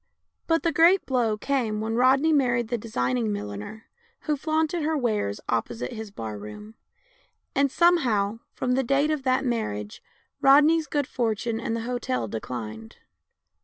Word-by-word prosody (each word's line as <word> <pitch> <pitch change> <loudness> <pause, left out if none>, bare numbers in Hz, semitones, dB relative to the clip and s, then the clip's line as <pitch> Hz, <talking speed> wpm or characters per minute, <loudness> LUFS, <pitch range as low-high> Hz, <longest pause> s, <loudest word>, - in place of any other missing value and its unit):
But 330 0 +2
the 335 - +2
great 335 +5 +5
blow 235 -5 +1
came 230 -4 -1
when 220 +1 -2
Rodney 265 +6 +4
married 240 -5 +2
the 240 - 0
designing 125 - -1
milliner 105 - -6 0.4
who 300 - 0
flaunted 315 +3 0
her 310 +1 0
wares 215 - -1
opposite 115 +1 -2
his 220 -1 -7
bar 110 - -6
room; 160 - -10 0.8
and, 280 -1 +2
somehow, 235 - +2
from 250 - -2
the 260 +1 +2
date 275 +4 +2
of 305 -2 -1
that 260 0 +1
mar 235 -3 0
riage, 105 0 -7 0.4
Rodney's 300 +3 +5
good 290 0 0
fortune 230 -2 -2
and 230 0 -2
the 230 - -3
hotel 225 - -2
declined. 110 0 -6
235 Hz, 155 wpm, -25 LUFS, -, 0.8 s, great